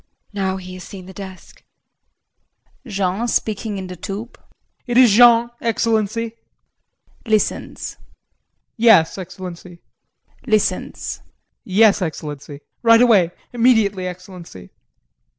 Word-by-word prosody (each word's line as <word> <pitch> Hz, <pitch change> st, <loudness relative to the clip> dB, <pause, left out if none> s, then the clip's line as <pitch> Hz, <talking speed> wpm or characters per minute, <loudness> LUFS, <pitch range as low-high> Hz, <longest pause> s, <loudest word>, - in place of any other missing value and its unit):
] -, -, -43 dB
JULIE. 200 Hz, -1 st, -3 dB
Now 190 Hz, 0 st, -1 dB
he 185 Hz, -1 st, -9 dB
has 185 Hz, -1 st, -9 dB
seen 190 Hz, -2 st, -10 dB
the 190 Hz, -, -11 dB
desk! 190 Hz, -2 st, -11 dB, 1.2 s
JEAN 195 Hz, +3 st, -1 dB
[Speaking 215 Hz, -2 st, -2 dB
in 190 Hz, -, -5 dB
the 180 Hz, 0 st, -8 dB
tube]. 200 Hz, +7 st, -7 dB, 0.5 s
It 240 Hz, 0 st, 0 dB
is 250 Hz, -4 st, +7 dB
Jean, 235 Hz, +2 st, +6 dB
Excellency. 230 Hz, 0 st, -1 dB, 0.9 s
[Listens]. 215 Hz, -1 st, -1 dB, 0.8 s
Yes, 220 Hz, -7 st, +5 dB
Excellency. 180 Hz, -1 st, -9 dB, 0.7 s
[Listens].Yes, 210 Hz, -1 st, 0 dB
Excellency, 150 Hz, -3 st, -6 dB, 0.2 s
right 230 Hz, -1 st, +6 dB
away 205 Hz, -8 st, +4 dB, 0.2 s
immediately, 220 Hz, -6 st, +2 dB
Excellency. 180 Hz, -, -10 dB
200 Hz, 100 wpm, -20 LUFS, 185-230 Hz, 1.2 s, is